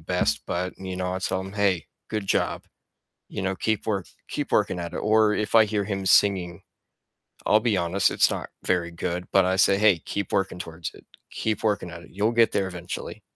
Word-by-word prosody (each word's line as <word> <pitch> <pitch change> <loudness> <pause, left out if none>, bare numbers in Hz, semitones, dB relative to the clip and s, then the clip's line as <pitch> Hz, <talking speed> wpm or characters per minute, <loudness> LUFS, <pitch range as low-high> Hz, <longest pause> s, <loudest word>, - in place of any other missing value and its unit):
best, 90 +2 0
but, 90 +1 -2
you 95 -1 -5
know, 90 0 -2
I - - -2
tell 95 0 -1
him, 95 +1 -7
"Hey, 100 -4 +1 0.2
good 105 -3 -3
job." - - 0 0.7
You - - -4
know, 95 0 -1
"Keep 110 +1 -1
work 100 -4 -1 0.2
keep - - -3
working 90 - +2
at 85 -1 -5
it." - - -3
Or 110 0 +3
if 105 +1 -1
I 110 - +8
hear 105 -1 -1
him 95 -2 -3
singing, 95 -3 +3 0.8
I'll 105 - +5
be 110 -4 +1
honest, 90 +3 +2
it's - - +4
not - - -4
very 85 -1 0
good, 90 +1 -4
but 95 -2 +5
I 95 0 +1
say, 95 0 +5
"Hey, 100 -5 +4
keep 100 +4 -4
working 95 -2 0
towards 80 -2 -6
it, - - -17 0.3
keep 110 -1 -2
working 105 -4 0
at 85 0 -9
it, - - -15
you'll 105 +5 +1
get 115 -1 +4
there 95 -1 0
eventually." 90 -1 -7
95 Hz, 210 wpm, -25 LUFS, 90-105 Hz, 0.8 s, I